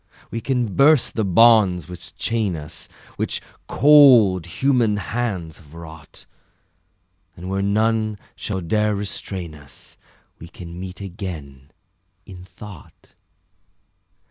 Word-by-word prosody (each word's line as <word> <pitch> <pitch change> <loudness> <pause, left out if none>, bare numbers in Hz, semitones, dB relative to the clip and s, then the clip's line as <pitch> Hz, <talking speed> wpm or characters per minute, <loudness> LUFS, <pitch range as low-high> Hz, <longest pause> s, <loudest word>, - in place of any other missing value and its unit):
We 115 - -4
can 125 -6 -1
burst 145 -1 +4
the 110 - -1
bonds 100 -4 +4
which 90 -1 -11
chain 110 -6 -1
us, 75 -2 -8 0.3
Which - - -2 0.3
cold 125 - +6
human 115 +2 +1
hands 100 -6 -4
have 75 -1 -17
wrought, 80 -2 -12 1.1
And 90 +2 -7
where 95 0 -1
none 110 +1 +1 0.2
shall 95 -3 -4
dare 105 +5 0
restrain 95 -4 -6
us 70 -2 -13 0.4
We 85 - -10
can 85 0 -10
meet 95 +1 -8
again, 80 -9 -8 0.6
in 90 -2 -11
thought. 95 -1 -14
95 Hz, 115 wpm, -21 LUFS, 85-110 Hz, 1.1 s, cold